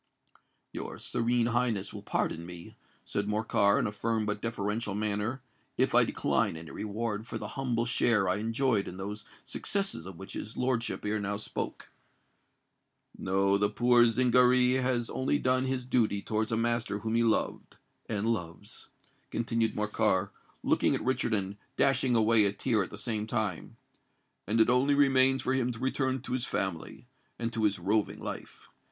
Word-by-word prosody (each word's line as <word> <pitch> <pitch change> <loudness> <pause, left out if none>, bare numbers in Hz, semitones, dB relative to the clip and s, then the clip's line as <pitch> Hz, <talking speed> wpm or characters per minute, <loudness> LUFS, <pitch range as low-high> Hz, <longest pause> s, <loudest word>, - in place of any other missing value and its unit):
"Your - - -6
Serene 120 0 0
Highness 120 -4 0
will - - -7
pardon 85 - -1
me," 85 0 -10 0.3
said 100 0 -2
Morcar, 105 -1 +2
in - - +1
a - - -1
firm 110 +1 -1
but 105 0 -2
deferential 105 -1 -2
manner, 105 +5 -1 0.3
"if - - +2
I - - +6
decline - - 0
any 80 -2 -9
reward 110 - -3
for - - -4
the - - -6
humble 125 -4 -1
share 115 -5 +2
I 90 - +1
enjoyed 115 0 0
in 90 - -7
those 105 +2 -6 0.2
successes 195 - -3
of 95 -3 -9
which 95 +1 -9
his 110 - -7
lordship 125 -4 -1
ere 105 +1 0
now 100 0 -2
spoke. 105 - -5 1.3
No:—the 100 +2 +2
poor 120 +2 +4
Zingaree 125 +1 +4
has 125 -2 0
only 130 +3 +1
done 130 -1 +1
his 130 -1 -2
duty 110 -6 +1
towards 110 +1 -1
a 110 - +1
master 115 -2 0
whom 110 +2 -3
he 115 - +3
loved—and 110 -1 -2
loves," 90 -8 -4 0.4
continued 115 -1 0
Morcar, 105 -2 +1 0.3
looking - - +2
at - - -4
Richard 125 -3 +1
and 100 0 -3 0.2
dashing 130 -2 +3
away 110 -1 +5
a 100 - +2
tear 110 0 +1
at 95 - -3
the 100 - -9
same 110 0 -2
time; 105 -6 -3 0.7
"and 110 +2 +1
it 110 - +6
only 135 +3 +3
remains 135 -1 +4
for 130 - 0
him 125 -2 +1
to 115 - -7
return 130 0 -1
to - - -4
his 130 0 -1
family—and 115 +6 -5
to 110 -1 +1
his 100 -2 +2
roving 105 0 0
life. - - -8
115 Hz, 165 wpm, -30 LUFS, 105-125 Hz, 1.3 s, I